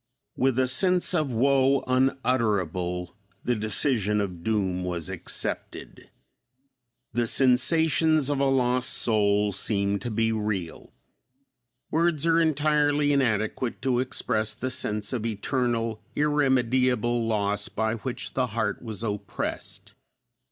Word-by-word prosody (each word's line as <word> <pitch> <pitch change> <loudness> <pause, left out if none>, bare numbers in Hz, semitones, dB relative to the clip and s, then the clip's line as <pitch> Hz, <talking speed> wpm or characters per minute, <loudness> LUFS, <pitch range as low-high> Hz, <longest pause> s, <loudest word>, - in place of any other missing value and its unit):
With 130 -1 +1
a 130 - +3
sense 180 +8 +2
of 155 -6 0
woe 135 +3 +2
unutterable 105 -10 0 0.3
the 125 - +1
decision 110 -1 0
of 90 -4 -4
doom 95 -4 -1
was 85 -3 -4
accepted. - - -5 1.0
The 120 +1 0
sensations 155 +4 +3
of 145 -1 -1
a 140 - +2
lost 125 -1 +1
soul 105 -2 +2
seemed 100 0 0
to 120 - -4
be 115 0 0
real. 105 -6 -4 1.0
Words 165 -1 +1
are 165 0 +3
entirely 150 -2 +2
inadequate 120 -2 -1
to 125 -2 +1
express 110 -4 -1
the 130 +1 -4
sense 105 0 -2
of 120 -4 -2
eternal, 115 0 -2
irremediable 130 -5 +1
loss 105 -2 0
by 110 0 -1
which 125 +2 -5
the 130 -1 0
heart 110 - -1
was 110 -2 -6
oppressed. 105 -2 -5
120 Hz, 115 wpm, -26 LUFS, 105-135 Hz, 1.0 s, a